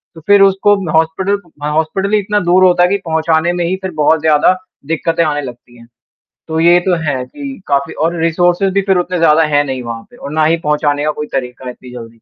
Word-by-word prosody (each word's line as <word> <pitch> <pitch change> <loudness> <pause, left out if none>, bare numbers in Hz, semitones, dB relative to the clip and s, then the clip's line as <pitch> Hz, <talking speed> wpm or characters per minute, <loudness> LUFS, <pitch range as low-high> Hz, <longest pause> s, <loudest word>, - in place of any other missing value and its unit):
तो 160 - -12
फिर 205 0 +5
उसको 195 +1 +4 0.2
हॉस्पिटल 175 +6 0 0.2
ह - - -1
हॉस्पिटल 175 +6 -1
ही 215 - +4
इतना 210 +1 -1
दूर 185 +1 +4
होता 175 -1 +4
है 180 - +3
कि 200 - +1
पहुँचाने 160 +1 +1
में 175 -1 -2
ही 185 - -1
फिर 190 - -4
बहुत 155 +1 +2
ज़्यादा 155 +3 +3 0.3
दिक्कतें 165 +1 0
आने 145 -1 -1
लगती 120 -2 -11
हैं। 115 0 -16 0.6
तो 160 0 -1
ये 175 +1 +5
तो 180 0 0
है 130 -4 -2
कि 275 -5 -9
काफ़ी 140 0 0
और 170 +1 -1
रिसोर्सेस 175 +3 +1
भी 200 +1 +1
फिर 190 -2 +1
उतने 180 0 -2
ज़्यादा 160 -1 +4
है 145 - +4
नहीं 130 -2 -4
वहाँ 115 -1 -6
पे 245 - -17
और 145 -10 -8
ना 155 0 +1
ही 165 +2 +2
पहुँचाने 150 -1 0
का 155 - +1
कोई 150 0 -6
तरीका 125 -1 -4
है 125 - -4
इतनी 125 0 -14
जल्दी। 115 -2 -8
160 Hz, 235 wpm, -14 LUFS, 145-185 Hz, 0.6 s, फिर